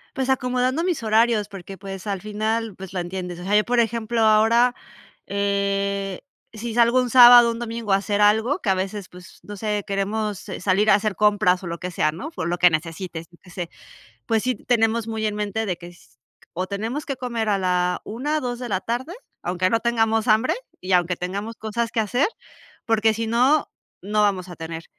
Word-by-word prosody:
Pues 265 0 -2
acomodando 255 +3 +1
mis 355 -6 -1
horarios, 220 -1 +2
porque, 195 0 -9
pues, 195 0 -8
al 200 -3 -3
final, 215 +1 -2
pues, 190 -1 -10
lo 185 - -2
entiendes. 180 0 -5
O - - -8
sea, 200 +3 +1
yo, 210 - +5
por 245 0 +1
ejemplo, 230 0 0
ahora, 225 +3 +4 0.5
eh, 200 -1 -1 0.3
si 225 +1 -6
salgo 240 +2 +4
un 250 - -2
sábado, 240 -1 +9
un 230 - -5
domingo 230 -3 -3
a - - +7
hacer 205 +1 -1
algo, 220 - +3
que 210 - -2
a 190 - +3
veces, 190 +1 -4
pues, 180 +1 -14
no 205 0 -9
sé, 210 0 -2
queremos 205 +1 -2
s - - -6
salir 200 +3 +3
a - - +7
hacer 210 0 -1
compras 200 -2 +2
o - - -5
lo 170 0 -5
que 180 - -4
sea, 155 -3 0
¿no?, 185 - -7
fo 325 - -5
lo 175 +1 -2
que 180 - +7
necesites, 165 +1 -4
yo 170 - -21
qué - - -18
sé. 175 -1 -6 0.6
Pues, 225 -2 +1
sí 255 +1 0
tenemos 225 0 0
muy 220 -1 -3
en 210 -1 0
mente 210 +1 -2
de 185 -4 -2
que 175 0 -10
s 175 -9 -19 0.3
o 185 +2 -3
tenemos 220 +9 -4
que 275 - -3
comer 235 -3 -3
a 205 - +3
la 180 -1 0
1, 290 +8 -2
2 245 -2 -4
de 245 -1 -5
la 190 -4 -1
tarde, 245 - -4 0.3
aunque 185 +1 0
no 230 - +2
tengamos 225 -1 +1
hambre 220 +3 +3 0.3
y 185 +1 -3
aunque 180 0 +2
tengamos 200 +6 -5
cosas 225 +1 -3
que 230 - +1
hacer, 245 +6 +1 0.6
porque 225 -1 +2
si 225 +1 -3
no, 255 +7 +3 0.3
no 210 +2 +1
vamos 190 -3 0
a 175 - -9
tener 165 0 -7
210 Hz, 210 wpm, -23 LUFS, 190-230 Hz, 0.6 s, sábado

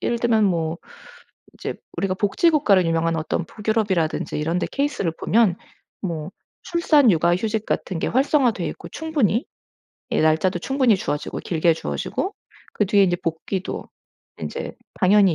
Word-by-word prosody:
예를 235 - 0
들면 225 -2 +3
뭐 165 -3 0 0.8
인제 - - -5 0.2
우리가 185 +2 0
복지국가로 210 - +3
유명한 165 0 +1
어떤 160 +2 -2
북유럽이라든지 200 -7 -1
이런데 165 +4 -1
케이스를 275 - -1
보면 215 -5 +3 0.5
뭐 165 -4 -4 0.3
출산 310 -6 +4
육아 170 0 +3
휴직 220 +1 -2
같은 185 - -2
게 - - -1
활성화 265 0 +3
되어 230 - -4
있고 - - -9
충분히 285 - 0 0.7
예 - - +1
날짜도 160 +4 +2
충분히 260 +3 +2
주어지고 150 -5 -3
길게 165 0 +2
주어지고 385 - -3 0.4
그 210 - +2
뒤에 200 0 +5
이제 175 -2 +1
복귀도 175 +3 -4 0.5
인제 - - -5 0.3
당연히 195 -2 +5
195 Hz, 335 characters per minute, -22 LUFS, 170-235 Hz, 0.8 s, 뒤에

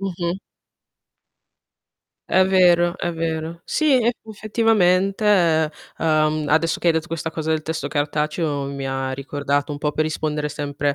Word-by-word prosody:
Mh-mh. 180 -2 -3 1.9
È 185 - +5
vero, 175 -2 +4
è 175 - -2
vero. 165 0 -4
Sì, 305 -3 +2
eff 240 - +3 0.2
effettivamente, 210 -3 +1
ehm, 155 -4 +1
adesso 160 +3 +2
che 175 - +1
hai - - +5
detto 160 0 -2
questa 165 -1 -4
cosa 160 0 -5
del 155 -1 -1
testo 160 +1 -4
cartaceo, 150 0 -1
mi 140 -1 -5
ha 135 0 -2
ricordato 145 +1 -2
un 145 - -5
po' 150 0 -1
per 155 - 0
rispondere 150 -1 -2
sempre 145 -1 -2
160 Hz, 145 wpm, -21 LUFS, 150-175 Hz, 1.9 s, È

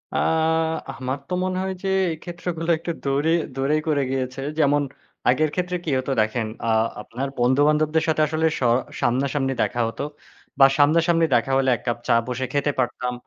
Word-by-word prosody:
আ - - +2 0.8
আমার 130 +1 -3
তো - - -3
মনে 185 0 -1
হয় 190 0 -2
যে - - -2 0.2
এই 160 - -5
ক্ষেত্রগুলো 170 -1 -5
একটু 165 +2 -4
দূরে 140 +3 +1 0.2
দূরেই 140 +3 +1
করে 150 -2 +2
গিয়েছে। 130 0 -3 0.2
যেমন 145 -1 +3 0.5
আগের 155 +5 +3
ক্ষেত্রে 180 0 -1
কি - - -2
হতো 130 +1 -2
দেখেন 110 +1 -1 0.2
আ - - -1 0.3
আপনার 125 +6 -5
বন্ধু-বান্ধবদের 150 +5 +3
সাথে 155 -1 +2
আসলে 155 +1 0
স - - -15 0.4
সামনাসামনি 135 +2 0
দেখা 120 - -1
হত। 115 - -8 0.6
বা 135 - +9
সামনাসামনি 165 +3 +4
দেখা 120 +3 +1
হলে 135 -1 +2
১ - - -10
কাপ 120 - 0
চা - - +4
বসে 125 +1 -2
খেতে 145 +1 +1
পারতাম 125 0 -1
145 Hz, 170 wpm, -23 LUFS, 130-160 Hz, 0.8 s, বা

